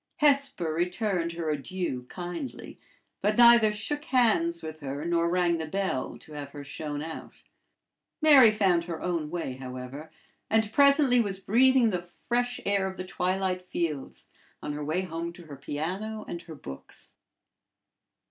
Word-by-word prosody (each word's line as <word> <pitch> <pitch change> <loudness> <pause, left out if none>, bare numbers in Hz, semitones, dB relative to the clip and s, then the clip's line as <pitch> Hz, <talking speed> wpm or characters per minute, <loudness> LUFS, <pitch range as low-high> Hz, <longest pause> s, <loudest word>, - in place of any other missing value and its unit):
Hesper 275 - +2
returned 175 0 -1
her 165 -2 -2
adieu 145 -3 -3
kindly, 175 +8 -6 0.4
but 210 +1 +1
neither 235 -2 +7
shook 295 +8 -3
hands 215 - +2
with 155 0 -7
her 140 +1 -5
nor 170 0 +1
rang 175 -1 +2
the 160 - -4
bell 190 -7 -2
to 155 - -14
have 145 -1 -6
her 145 -1 -7
shown 145 +1 -5
out 160 0 -9 0.8
Mary 285 -7 +8
found 190 -5 +2
her 170 -2 -5
own 170 -4 -2
way, 165 -6 -3
however, 130 +3 -7 0.4
and 220 0 +1
presently 280 -2 +5
was 200 -4 0
breathing 240 +4 +4
the 180 -2 -1
fresh 245 +8 -2
air 200 -1 +1
of 190 0 -7
the 185 - -5
twilight 185 0 -1
fields 165 -6 -4 0.4
on 150 - -3
her 150 0 -4
way 155 +5 0
home 170 -2 -4
to 175 - -13
her 145 -2 -9
piano 185 +11 -4
and 170 - -5
her 165 -2 -10
books. 70 - -10
175 Hz, 155 wpm, -28 LUFS, 155-215 Hz, 0.8 s, Mary